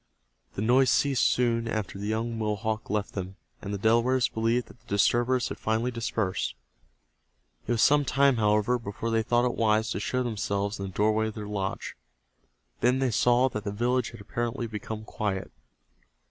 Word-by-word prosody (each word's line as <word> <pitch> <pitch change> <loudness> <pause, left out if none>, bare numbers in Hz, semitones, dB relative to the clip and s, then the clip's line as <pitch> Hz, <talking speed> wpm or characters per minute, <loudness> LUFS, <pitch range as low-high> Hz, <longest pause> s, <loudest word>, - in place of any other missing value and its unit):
The 100 - -2
noise 125 +3 +4
ceased 135 0 +3
soon 115 -2 +1
after 110 -3 -3
the 100 - -4
young 115 +2 -1
Mohawk 110 0 -2
left 105 0 -2
them, 95 0 -5 0.3
and 100 - -5
the 100 - -2
Delawares 120 +4 +3
believed 115 +2 0
that - - -17
the - - -32
disturbers 120 +5 +2
had - - -6
finally 110 +3 0
dispersed. 110 - -2 1.1
It 120 - +1
was 115 - +2
some 145 0 +5
time, 140 -1 +3
however, 105 +3 +2
before 115 +1 -4
they 115 0 +2
thought 120 +2 +2
it 125 - 0
wise 110 0 +1
to - - -2
show 125 +5 -1
themselves 100 -3 -2
in 95 - -3
the - - -7
doorway 110 +3 +1
of 110 - -6
their 105 - -5
lodge. 100 -2 -4 0.8
Then 125 +2 +3
they 130 -2 +1
saw 120 +4 +4
that 105 -4 -5
the 100 - -3
village 120 +3 0
had 115 -3 -12
apparently 120 +3 -3
become 110 0 -6
quiet. 100 -3 -3
110 Hz, 180 wpm, -27 LUFS, 105-120 Hz, 1.1 s, some